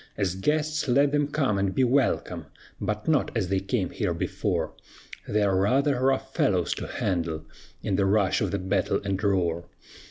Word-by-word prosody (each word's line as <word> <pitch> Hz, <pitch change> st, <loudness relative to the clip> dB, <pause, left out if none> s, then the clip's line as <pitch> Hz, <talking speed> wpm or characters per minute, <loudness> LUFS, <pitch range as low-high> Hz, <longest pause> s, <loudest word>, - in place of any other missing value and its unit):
As 95 Hz, -3 st, 0 dB
guests 150 Hz, +10 st, 0 dB
let 140 Hz, +3 st, +4 dB
them 145 Hz, -1 st, +2 dB
come 135 Hz, -9 st, 0 dB
and 95 Hz, -1 st, 0 dB
be 130 Hz, -, +3 dB
welcome, 130 Hz, +2 st, +1 dB, 0.3 s
But 105 Hz, 0 st, -3 dB
not 155 Hz, -5 st, +2 dB
as 95 Hz, -5 st, -1 dB
they 95 Hz, 0 st, +2 dB
came 95 Hz, -1 st, -1 dB
here -, -, -1 dB
before; -, -, -2 dB, 0.5 s
They 105 Hz, 0 st, +1 dB
are 100 Hz, -2 st, +2 dB
rather 130 Hz, +8 st, +2 dB
rough 135 Hz, 0 st, +1 dB
fellows -, -, +1 dB
to -, -, -6 dB
handle 85 Hz, -4 st, -2 dB, 0.4 s
In 95 Hz, -3 st, 0 dB
the 95 Hz, -, +2 dB
rush 100 Hz, -1 st, +2 dB
of -, -, +1 dB
the 100 Hz, -, -1 dB
battle 95 Hz, +1 st, 0 dB
and 100 Hz, 0 st, -2 dB
roar. 85 Hz, -4 st, 0 dB
100 Hz, 180 wpm, -26 LUFS, 95-135 Hz, 0.5 s, let